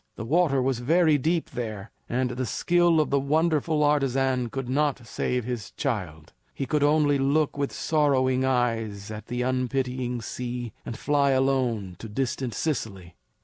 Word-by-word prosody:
The 115 - -6
water 145 -2 +2
was 130 -2 0
very 155 +3 +3
deep 165 +4 0
there, 110 -4 -5 0.2
and 125 +1 0
the 125 +1 -2
skill 175 +6 +3
of 155 - +1
the 140 - +3
wonderful 155 +1 +1
artisan 135 -4 +1
could 135 +1 -4
not 135 -1 0
save 125 +1 -2
his 120 -4 -4
child. 90 - -4 0.2
He 135 - -2
could 150 +3 0
only 145 -1 +3
look 145 +2 +1
with 140 -1 -2
sorrowing 130 -4 +1
eyes 115 -5 -1
at 110 0 -8
the 125 +1 -2
unpitying 125 -1 -1
sea, 120 0 -5
and 115 - -5
fly 140 -2 +2
on - - +3
alone 120 -9 -1
to 115 - -8
distant 125 0 -2
Sicily. 100 - -3
130 Hz, 160 wpm, -26 LUFS, 120-145 Hz, 0.2 s, very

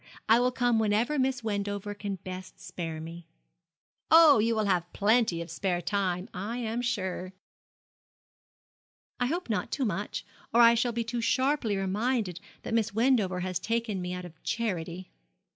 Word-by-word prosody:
I 225 +2 +6
will 250 +1 +2
come 245 -2 +2
whenever 220 +7 +1
Miss 260 -2 0
Wendover 205 -1 -2
can 205 -1 -4
best 185 0 -9
spare 165 -4 -5
me.' 165 +1 -9 0.8
'Oh, 315 -6 +8
you 230 +2 +2
will 215 - +1
have 175 -3 0
plenty 215 -4 +2
of 165 - -11
spare 180 0 -1
time, 185 -1 -1
I 205 +6 -4
am 235 0 -2
sure.' 190 -6 -3 1.9
'I 245 - +1
hope 345 +6 -2
not 215 -3 -1
too 270 - 0
much, 205 +1 -3 0.3
or - - +6
I 235 0 +8
shall 240 +1 +1
be 235 0 -2
too 235 +1 -3
sharply 255 -3 +1
reminded 195 -1 -1 0.2
that - - -4
Miss 225 -2 +1
Wendover 220 -7 +2
has 185 -1 -2
taken 225 -1 -2
me 180 0 -4
out 180 0 -5
of 160 -2 -13
charity.' 185 -5 -3
210 Hz, 160 wpm, -29 LUFS, 185-235 Hz, 1.9 s, Oh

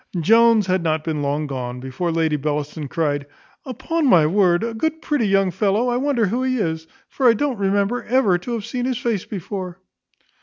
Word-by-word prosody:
Jones 225 +4 +4
had 185 0 0
not 160 -2 -1
been 155 -2 -2
long 145 +2 -1
gone, 125 -3 -5
before 130 +7 -3
Lady 160 -2 +1
Bellaston 150 +1 -3
cryed, 145 -1 -2 0.4
"Upon 285 +5 -1
my 170 -10 +5
word, 175 +1 +2
a 230 0 -3
good 315 +8 -2
pretty 290 -9 0
young 195 -1 +2
fellow; 205 +6 +1
I 245 - 0
wonder 260 -4 +1
who 230 +6 -1
he 260 0 0
is; 160 -6 -2 0.2
for 260 -3 +2
I - - +6
don't 265 -2 -2
remember 200 +4 0
ever 225 -8 +2
to 240 +7 -5
have 220 -3 -4
seen 250 -1 -3
his 255 -2 -1
face 230 -6 -2
before." 185 -2 -6
195 Hz, 195 wpm, -21 LUFS, 160-240 Hz, 0.4 s, I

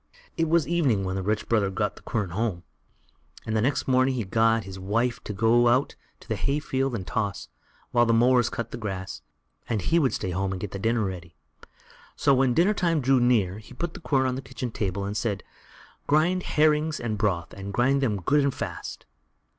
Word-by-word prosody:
It 165 -1 0
was 170 -1 +3
evening 145 -12 +1
when 95 0 -2
the 95 - -2
rich 105 +3 -1
brother 105 -4 +2
got 105 +2 -2
the - - -14
quern 105 -6 -2
home, 100 -3 -2 0.8
and 110 - -2
the 110 - +2
next 135 +5 0
morning 130 0 +3
he 115 -4 -2
told 115 +2 +2
his 95 -1 -8
wife 115 +4 -1
to - - -4
go 115 +4 +3
out 125 +4 +2 0.2
into - - -19
the - - -2
hay 140 +1 0
field 135 -3 -1
and 95 -5 -4
toss, 105 -3 -3 0.4
while 120 -1 +3
the - - +3
mowers 120 +1 +4
cut 115 -1 -5
the - - -6
grass, 95 -4 -5 0.5
and 115 -3 0
he 165 - +2
would 135 -5 +2
stay 95 - -3
at - - -4
home 95 0 -1
and 95 - -5
get 100 0 -5
the 100 - -5
dinner 115 +2 +1
ready. 90 -3 -7 0.8
So, 140 - +3
when 130 -2 +3
dinner 185 +5 +4
time 170 -5 +1
drew 135 -1 +3
near, 110 -6 +2
he 110 +4 -14
put 170 +5 -3
the - - -9
quern 135 -6 +1
on 130 - 0
the 130 - -4
kitchen 130 -2 -6
table 100 -2 -2
and 100 +1 -4
said: 105 -3 -2 0.6
"Grind 165 +5 +3 0.2
herrings 155 0 +3
and 115 -2 -2
broth, 95 -5 -1
and 100 0 -7
grind 135 +6 +2
them 105 -8 -1
good 145 - +3
and 140 -1 0
fast." - - -6
115 Hz, 220 wpm, -26 LUFS, 100-135 Hz, 0.8 s, mowers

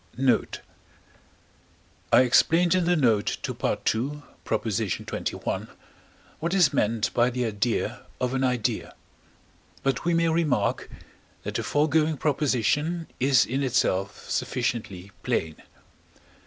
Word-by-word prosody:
Note. 130 -1 +1 1.5
I - - +7
explained 165 +7 +4
in 185 -2 +2
the 175 +1 +3
note 115 -9 +2
to - - -2
II. 140 +6 -1 0.2
xxi. 110 -3 -2 0.7
what 170 +3 -2
is 180 -7 +4
meant 110 0 0
by 120 +1 +3
the 125 0 -2
idea 110 +1 -1 0.2
of 125 0 -1
an 135 0 0
idea; 125 -4 -1 0.9
but 135 -2 0
we 170 +1 +1
may 165 0 +2
remark 160 -3 0 0.5
that - - -4
the - - -1
foregoing 155 +1 +1
proposition 150 +4 0
is 135 0 +4
in 135 +3 -2
itself 105 -7 0
sufficiently 105 -6 -3
plain. 80 -1 -1
130 Hz, 115 wpm, -26 LUFS, 115-155 Hz, 1.5 s, I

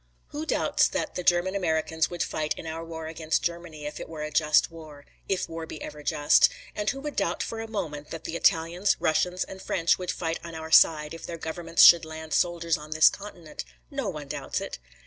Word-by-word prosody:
Who 305 +2 -5
doubts - - +2
that - - -3
the - - -3
German 175 +1 +2
Americans 160 -4 0
would 175 -1 -2
fight 155 -1 -2
in - - -8
our 160 +1 -5
war 160 -1 -7
against 160 0 -1
Germany, 170 -3 -4
if 150 0 -5
it - - -7
were 155 -2 -6
a 150 - -5
just 150 +2 +3
war 155 -3 -12 0.2
if 190 -2 0
war 165 0 -6
be 155 - -8
ever 150 0 -8
just; 150 0 +4 0.3
and 210 -1 0
who 275 - -3
would 295 0 -5
doubt 180 -4 0
for 225 - -5
a 225 - -5
moment 160 -9 -5
that 165 - -7
the 165 - -5
Italians, 170 +4 +2
Russians 180 +3 +1
and 190 0 -10
French 170 -2 +1
would 180 -1 -5
fight 165 -1 -2
on 170 -1 -8
our 160 0 -7
side 155 -1 +5
if 165 - -8
their 170 - -5
governments 165 +1 +1
should 170 -1 +9
land 160 -1 -7
soldiers 170 -1 +1
on 150 +1 -10
this 155 0 +7
continent? 180 -6 -9 0.3
No 275 -7 -2
one 150 -5 -7
doubts - - -3
it. - - -6
165 Hz, 220 wpm, -27 LUFS, 155-180 Hz, 0.3 s, should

